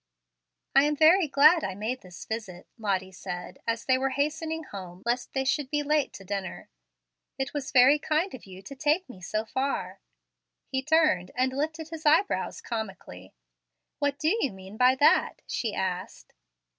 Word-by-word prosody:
"I 275 - +7
am 300 0 +1
very 320 +4 +5
glad 295 +4 +6
I 190 - -3
made 225 +6 -3
this 180 -1 -11
visit," 215 -6 -6
Lottie 190 -3 -1
said, 175 0 -7
as 230 0 -1
they 260 -1 +3
were 270 +1 +1
hastening 315 +4 -2
home 185 - -9
lest 240 +1 -1
they 265 0 -1
should 270 0 0
be 295 0 0
late 300 -1 +1
to 195 - -10
dinner. 195 -1 -5 0.7
"It 270 - -3
was 285 -3 -4
very 265 +3 +6
kind 315 +6 0
of 240 - -10
you 190 0 -11
to 275 - -9
take 305 +7 +1
me 190 -7 -12
so 215 +4 -2
far." 265 +4 -2 0.7
He 265 -1 -2
turned 305 - +3
and 260 +1 +1
lifted 315 +3 -3
his 320 -1 -8
eyebrows 320 +7 +2
comically. 195 - -7 0.6
"What 285 -1 0
do 315 +8 +2
you 270 - +1
mean 190 +1 -11
by 250 +3 +5
that?" 285 +3 +3
she 225 -4 -3
asked. 185 -1 -4
260 Hz, 170 wpm, -27 LUFS, 195-300 Hz, 0.7 s, I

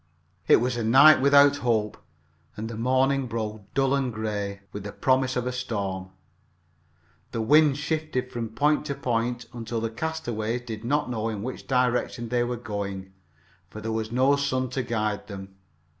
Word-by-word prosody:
It - - +8
was 125 +1 0
a 120 - -1
night 135 +6 +7
without 140 +1 +6
hope, 110 -5 0 0.6
and 110 +1 -4
the 115 - -6
morning 130 +3 +1
broke 110 -3 -5
dull 135 0 +2
and 135 -3 0
gray, 105 -2 -4
with 105 - -7
the 105 - -6
promise 130 +1 +1
of 125 - -1
a 125 - -1
storm. 100 -7 -3 1.2
The 115 - -1
wind 145 +3 +5
shifted 150 -4 -2
from 115 -2 -4
point 145 +7 +1
to 140 - -2
point 120 0 -1
until 115 -1 -4
the 115 0 -2
castaways 120 -5 -3
did 110 -3 -7
not 140 +1 0
know 115 -1 -2
in 105 -2 -4
which 130 +2 -6
direction 125 -2 0
they 120 0 +1
were 120 0 -2
going, 100 -4 -5 0.6
for 110 - -9
there 110 +1 -4
was 110 0 -2
no 130 +3 +4
sun 130 -3 -1
to 130 - -1
guide 110 -3 -2
them. 95 -2 -8
120 Hz, 175 wpm, -26 LUFS, 110-130 Hz, 1.2 s, It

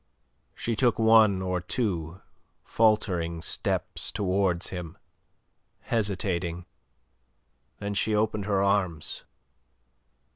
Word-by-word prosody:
She 115 - -2
took 120 +1 +2
one 110 -4 +5
or 90 -1 -1
two 90 -5 -2 0.4
faltering 90 -7 +1
steps - - -1
towards 95 -2 0
him, 90 -3 -7 0.8
hesitating. 90 -5 -1 1.1
Then 100 0 -4
she 105 +1 +1
opened 105 -1 0
her 100 -2 +1
arms. 95 -6 0
100 Hz, 85 wpm, -27 LUFS, 90-110 Hz, 1.1 s, one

